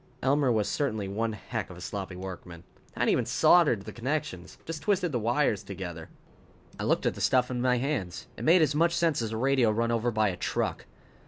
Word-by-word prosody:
Elmer 135 0 +3
was 110 -3 +1
certainly 110 -9 -1
one 110 +3 -2
heck 105 0 -5
of 90 - -10
a - - -11
sloppy 95 0 -5
workman. 90 -2 -8 0.3
Hadn't - - 0
even - - +2
soldered 150 - +4
the - - -8
connections. 120 - -4
Just 160 -2 -5
twisted 180 0 +1
the 125 - 0
wires 115 -2 +1
together. 90 -4 -7 0.7
I - - -2
looked - - +1
at - - +2
the - - -8
stuff 125 -1 +2
in 125 -1 -2
my 125 0 +2
hands. 120 - -3
It - - -8
made 170 +1 +5
as 150 -2 +1
much 170 +3 +2
sense 165 -6 +1
as 110 -1 -3
a 110 - -3
radio 130 -1 +3
run 115 +2 0
over 115 +1 +1
by 110 -2 +1
a 90 - -5
truck. - - -2
115 Hz, 215 wpm, -28 LUFS, 100-145 Hz, 0.7 s, made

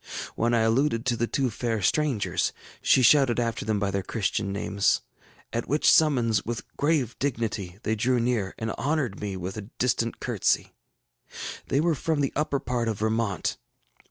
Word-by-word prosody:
When 120 +1 +2
I 115 - +3
alluded 115 +1 +2
to 125 -2 +2
the 120 +1 0
two 135 -2 0
fair 115 0 -2
strangers, 100 - +1 0.3
she 130 - +4
shouted 130 -1 +5
after 115 -2 -1
them 110 -1 +1
by 100 -1 0
their 100 0 -1
Christian 100 0 -2
names, 100 0 +1 0.5
at 115 - -2
which 150 +3 +4
summons, 125 -9 +3
with 115 0 -4
grave 145 -6 +1
dignity, 110 -9 -2
they 110 - 0
drew 120 +3 +1
near, 115 -5 0
and 110 0 -3
honored 140 -8 -1
me 100 -2 -3
with 95 +3 -5
a 105 0 -7
distant 115 -2 0
courtesy. - - 0 0.9
They 135 - +1
were 165 +2 +2
from 155 0 -1
the 135 - 0
upper 145 -1 0
part 120 -3 -2
of 110 -3 -1
Vermont. 110 -3 -1
115 Hz, 170 wpm, -26 LUFS, 105-135 Hz, 0.9 s, shouted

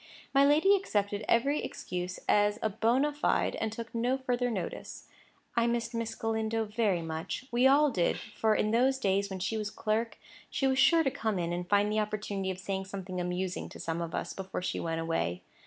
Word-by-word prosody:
My 275 0 +6
lady 310 +8 +5
accepted 205 - -1
every 275 +6 +2
excuse 180 0 -4
as 205 0 +3 0.2
bona 260 +7 +3
fide, 295 - +1
and 220 - -2
took 230 +1 -7
no 245 +3 +1
further 250 -2 0
notice. 195 -7 -5 0.5
I 235 0 +3
missed 235 0 -1
Miss 230 -1 -3
Galindo 225 0 -1
very 210 -5 0
much; 160 +9 -4
we 245 +2 +5
all 285 +2 +5
did; 175 -7 +1
for, 215 0 0
in 215 - +1
the 260 +4 +3
days 200 -3 +1
when 190 - -4
she 205 +4 -2
was 210 -1 -2
clerk, 220 +1 -1 0.3
she 270 - -1
was 265 -1 +2
sure 330 +4 +6
to 270 - +1
come 220 -7 -1
in 170 -1 -1
and 175 0 -4
find 205 0 +3
the 215 - +1
opportunity 205 -2 -2
of 185 - -3
saying 190 0 -3
something 190 -2 -5
amusing 180 +1 -3
to - - -11
some 165 +1 -3
of 165 -1 -4
us - - -3
before 190 -1 -5
she - - -2
went 165 -1 -2
away. 165 - -1
215 Hz, 200 wpm, -30 LUFS, 190-240 Hz, 0.5 s, My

